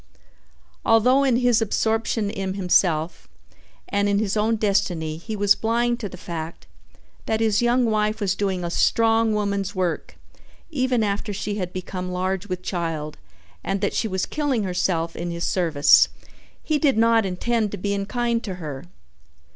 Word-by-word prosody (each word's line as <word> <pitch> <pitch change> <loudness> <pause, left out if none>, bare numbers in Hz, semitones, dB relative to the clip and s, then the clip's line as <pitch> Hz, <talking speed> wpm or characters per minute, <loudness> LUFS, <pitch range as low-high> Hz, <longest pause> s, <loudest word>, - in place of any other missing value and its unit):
Although 250 +5 +4
in 265 -3 +3
his 245 -2 +3
absorption 220 -1 0
in 190 -2 -3
himself 175 -4 +1 0.6
and 200 0 0
in 200 - +2
his 210 -1 0
own 220 +2 +2
destiny 190 -7 0
he 215 +6 -6
was 205 -1 +4
blind 235 +2 0
to 205 - -4
the 180 - -10
fact 165 -2 -7 0.6
that 220 - 0
his 220 -1 +2
young 240 +1 +3
wife 215 -1 0
was 200 -3 +1
doing 195 -3 -2
a 170 - -3
strong 225 +3 +3
woman's 200 -1 -1
work 180 -3 -2 0.5
even 255 -5 +1
after 205 +1 -2
she 205 +1 -3
had 180 -3 -3
become 185 0 -5
large 185 +2 -2
with 185 -1 -4
child 165 -5 -3 0.4
and 195 - -1
that - - 0
she 220 - 0
was 190 -2 -1
killing 285 -7 -1
herself 180 -3 -1
in 175 +1 -4
his 170 0 -4
service, 160 -6 +4 0.5
he 310 -2 0
did 275 -5 +2
not 230 0 +4
intend 210 +4 -1
to 205 - -5
be 200 +2 -2
unkind 235 +4 -1
to 190 -4 -4
her. 150 -6 -7
200 Hz, 165 wpm, -23 LUFS, 180-225 Hz, 0.6 s, Although